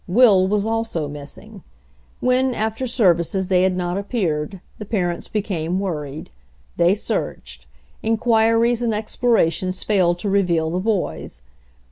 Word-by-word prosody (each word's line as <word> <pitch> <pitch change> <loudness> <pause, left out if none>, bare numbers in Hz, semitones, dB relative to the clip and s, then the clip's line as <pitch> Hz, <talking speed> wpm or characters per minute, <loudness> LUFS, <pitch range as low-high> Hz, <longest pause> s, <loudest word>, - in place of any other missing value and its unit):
Will 195 -2 +5
was 205 +1 0
also 225 -8 -2
missing. 150 +9 -10 0.6
When, 255 0 +2
after 220 +4 -2
services, 190 -5 +1
they 180 -1 +3
had 185 -1 +1
not 180 +1 -2
appeared, 190 -5 -2 0.2
the 210 - -6
parents 180 -5 -2
became 185 -4 -2
worried. 150 - -5 0.4
They 175 +3 +3
searched. 65 - -4 0.3
Inquiries 225 +1 +2
and 230 -3 0
explorations 200 -5 0
failed 180 -5 +2
to 180 - -5
reveal 175 -5 +1
the 180 - -1
boys. 190 - -3
195 Hz, 125 wpm, -21 LUFS, 175-225 Hz, 0.6 s, Will